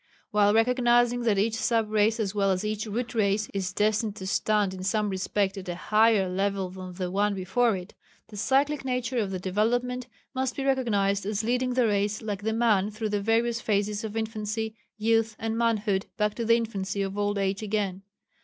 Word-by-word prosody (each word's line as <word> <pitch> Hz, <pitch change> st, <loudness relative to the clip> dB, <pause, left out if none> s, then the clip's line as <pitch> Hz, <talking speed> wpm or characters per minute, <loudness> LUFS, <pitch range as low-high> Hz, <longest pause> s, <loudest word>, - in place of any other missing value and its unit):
While 210 Hz, 0 st, +4 dB
recognizing 240 Hz, +1 st, +3 dB
that 215 Hz, -3 st, +3 dB
each 215 Hz, +3 st, +1 dB
sub 225 Hz, -1 st, 0 dB
race 215 Hz, +1 st, +2 dB
as 205 Hz, -3 st, -1 dB
well 200 Hz, -1 st, +1 dB
as 190 Hz, +2 st, 0 dB
each 215 Hz, +1 st, -2 dB
Root 235 Hz, +4 st, -3 dB
Race 215 Hz, -1 st, +1 dB
is 190 Hz, -2 st, -2 dB
destined 210 Hz, +1 st, 0 dB
to 190 Hz, -, -7 dB
stand 205 Hz, 0 st, +1 dB
in 185 Hz, -, -7 dB
some 210 Hz, +2 st, 0 dB
respects 195 Hz, +1 st, -1 dB
at 185 Hz, -1 st, -8 dB
a 175 Hz, -, -2 dB
higher 215 Hz, +1 st, +3 dB
level 195 Hz, 0 st, -1 dB
than 185 Hz, -1 st, -8 dB
the 180 Hz, 0 st, -4 dB
one 205 Hz, +1 st, +1 dB
before 195 Hz, +5 st, +1 dB
it, 180 Hz, +2 st, -10 dB, 0.4 s
the 215 Hz, -, -11 dB
cyclic 275 Hz, +7 st, +1 dB
nature 250 Hz, -1 st, -1 dB
of 205 Hz, -3 st, -1 dB
the 190 Hz, -, -3 dB
development 240 Hz, +7 st, -1 dB, 0.3 s
must 260 Hz, -1 st, -1 dB
be 270 Hz, -, -3 dB
recognized 205 Hz, -7 st, +1 dB
as 210 Hz, 0 st, -1 dB
leading 250 Hz, +2 st, 0 dB
the 250 Hz, -2 st, +3 dB
race 205 Hz, 0 st, +1 dB
like 205 Hz, -3 st, -4 dB
the 220 Hz, +2 st, -1 dB
man 220 Hz, -3 st, +2 dB
through 215 Hz, +1 st, -4 dB
the 205 Hz, -1 st, -1 dB
various 230 Hz, +2 st, +1 dB
phases 210 Hz, 0 st, 0 dB
of 220 Hz, 0 st, -4 dB
infancy, 220 Hz, 0 st, -3 dB, 0.2 s
youth, 225 Hz, 0 st, +1 dB
and 225 Hz, 0 st, -2 dB
manhood 215 Hz, -4 st, +1 dB
back 210 Hz, -1 st, +1 dB
to 235 Hz, -, -3 dB
the 230 Hz, +1 st, +5 dB
infancy 200 Hz, -3 st, -2 dB
of 195 Hz, 0 st, -4 dB
old 205 Hz, 0 st, 0 dB
age 195 Hz, +1 st, -1 dB
again. 205 Hz, -3 st, -2 dB
210 Hz, 200 wpm, -27 LUFS, 200-230 Hz, 0.4 s, the